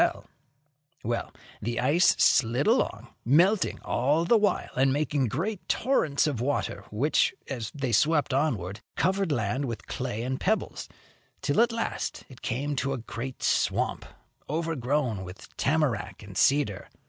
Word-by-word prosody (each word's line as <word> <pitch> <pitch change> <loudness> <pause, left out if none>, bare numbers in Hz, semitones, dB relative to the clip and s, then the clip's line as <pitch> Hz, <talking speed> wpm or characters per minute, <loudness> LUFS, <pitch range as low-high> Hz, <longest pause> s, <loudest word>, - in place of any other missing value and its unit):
Well, 115 +1 -2 0.3
the 120 +2 -2
ice 150 +8 +4
slid 125 0 +3
along, 130 - +1
melting 175 - +3
all 145 +7 +1
the 235 - +4
while, 210 -2 +1
and 135 +1 +3
making 145 -2 +1
great 185 - -3
torrents 165 - +2
of 140 -7 -1
water 125 -6 -2
which, 130 +9 +2
as 120 -6 -4
they 135 -4 -2
swept 150 +5 +3
onward, 110 - 0 0.2
covered 190 -1 +1
land 130 +1 0
with 115 -3 -5
clay 120 -3 -3
and 130 +1 -2
pebbles, 220 +3 -1 0.5
till - - +3
at 235 0 +3
last 230 0 -3
it 130 - -14
came 145 +5 -2
to 135 +1 0
a - - -2
great 125 +2 -6
swamp, - - +1 0.4
overgrown 145 - -1
with 90 +2 -11
tamarac 120 - 0
and 100 -2 -11
cedar. 135 -7 +2
135 Hz, 140 wpm, -27 LUFS, 115-155 Hz, 0.5 s, ice